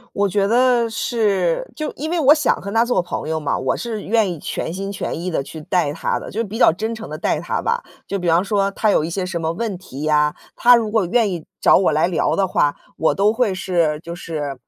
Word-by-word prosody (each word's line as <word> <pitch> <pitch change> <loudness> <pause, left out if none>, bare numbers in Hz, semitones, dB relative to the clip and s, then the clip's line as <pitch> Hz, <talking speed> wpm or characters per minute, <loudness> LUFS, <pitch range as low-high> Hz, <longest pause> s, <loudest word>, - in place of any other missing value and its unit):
我 200 0 +2
觉 200 +1 +1
得 240 0 +3
是， 205 -7 0
就 310 - -3
因 310 +3 -4
为 345 - 0
我 295 -1 +7
想 310 - +2
和 200 - -6
她 225 +1 +3
做 240 -6 +1
朋 175 - -5
友 160 0 -1
嘛， 150 - -1
我 130 - -1
是 225 -3 -4
愿 215 -4 +1
意 165 - -6
全 165 - -4
心 195 +1 -4
全 195 - -4
意 180 +2 -3
地 150 -5 -1
去 160 +2 -9
带 160 -3 0
她 165 - -1
的， - - -9
就 220 - -4
是 - - +1
比 215 +1 -6
较 245 - +6
真 220 +6 -3
诚 220 - -8
地 - - -5
带 - - 0
她 - - -2
吧。 475 +2 -1 0.2
就 200 - -2
比 180 - -3
方 170 +3 +4
说 200 -1 0
她 215 +1 0
有 155 - +3
一 165 - -3
些 185 +2 -2
什 180 -2 -3
么 160 0 -1
问 205 +1 -3
题 150 -6 -10
呀， 150 -1 +2 0.2
她 245 +1 +6
如 225 -3 0
果 215 -4 +1
愿 225 +2 +2
意 170 -3 -5 0.2
找 - - +6
我 185 - +2
来 155 +2 +2
聊 175 -3 0
的 195 -1 +1
话， 145 -5 +1 0.2
我 160 - +2
都 205 +2 +3
会 225 -3 +1
是， 170 -5 0
就 170 0 -7
是 150 -5 -5
195 Hz, 280 characters per minute, -20 LUFS, 165-225 Hz, 0.2 s, 我